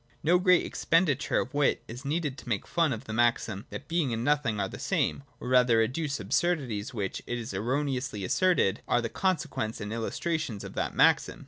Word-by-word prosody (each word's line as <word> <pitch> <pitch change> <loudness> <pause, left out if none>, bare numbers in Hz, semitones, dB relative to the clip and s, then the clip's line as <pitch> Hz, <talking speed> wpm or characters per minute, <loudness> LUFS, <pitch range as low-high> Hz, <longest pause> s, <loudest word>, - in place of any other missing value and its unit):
(2) - - -33
No 175 +4 +4
great 180 -1 +4
expenditure 160 -5 +1
of 125 - -7
wit 145 -1 +2
is 120 +4 -8
needed 145 -1 -1
to 135 - -10
make 105 -4 -1
fun 165 -3 +1
of 115 -1 -4
the 110 - -7
maxim 115 -2 +1
that - - -8
Being 165 -6 0
and 115 0 -2
Nothing 140 -6 +1
are 100 - 0
the - - -9
same, - - 0 0.2
or - - -7
rather 125 -2 +4
to 115 - +5
adduce 140 +1 -3
absurdities 120 - -1
which, 100 -6 -3
it 120 - -2
is 115 -3 -6
erroneously 125 0 -2
asserted, 175 - +2
are 120 - +3
the 115 - -2
consequences 155 - -1
and 105 +1 -5
illustrations 115 0 -2
of - - -8
that - - -2
maxim. - - +3
125 Hz, 205 wpm, -28 LUFS, 110-155 Hz, 0.2 s, to